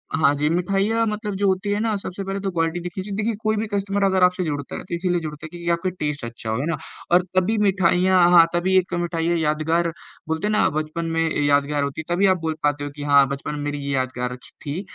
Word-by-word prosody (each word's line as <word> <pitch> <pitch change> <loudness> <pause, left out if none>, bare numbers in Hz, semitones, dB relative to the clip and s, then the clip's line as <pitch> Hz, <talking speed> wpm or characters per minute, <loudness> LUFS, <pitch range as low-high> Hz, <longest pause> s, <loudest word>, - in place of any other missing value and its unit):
हाँ 145 -3 +4
जी, 150 +1 0
मिठाइयाँ 195 +6 +1
मतलब 210 -1 -3
जो 200 +1 +1
होती 190 +2 0
हैं 205 - 0
ना, 220 -2 0
सबसे 195 0 -6
पहले 195 +1 -3
तो 195 -1 -2
क्वालिटी 165 0 0
देखनी 180 +2 -5
चाहिए। 200 -1 -5
देखिए, 225 +2 0
कोई 215 0 +2
भी 220 +1 -1
कस्टमर 200 0 0
अगर 190 -1 +3
आपसे 180 0 +3
जुड़ता 145 -3 -4
है, - - -6
तो 175 - -4
इसीलिए 175 0 0
जुड़ता 150 0 -7
है - - -7
कि 170 0 -4
आपका 170 +2 0
टेस्ट 150 -3 -2
अच्छा 115 -1 -7
हो, 110 - 0
है 145 - -1
ना? 165 - -1 0.3
और 175 +1 +5
तभी 200 +4 +2
मिठाइयाँ 185 -1 +3
हाँ, 170 -2 +8
तभी 185 +2 +1
एक 185 0 +1
ये 175 - 0
मिठाई 165 -1 -1
यादगार, 160 +2 +1 0.4
बोलते 160 +6 -1
हैं 215 - 0
ना 215 - +3
बचपन 155 +2 -3
में - - +3 0.2
यादगार 145 0 +2
होती 140 +3 -3
है, 175 +2 -2
तभी 195 - +3
आप - - -5
बोल 160 -1 -1
पाते 145 0 +1
हो 145 - -3
कि 145 - -6
हाँ, 140 -1 +5
बचपन 140 +2 -4
में 145 - -5
मेरी 145 0 -3
ये 140 - -1
यादगार 130 -1 -2
अच्छी 125 0 -11
थी, 150 +6 -3
170 Hz, 255 wpm, -22 LUFS, 150-195 Hz, 0.4 s, हाँ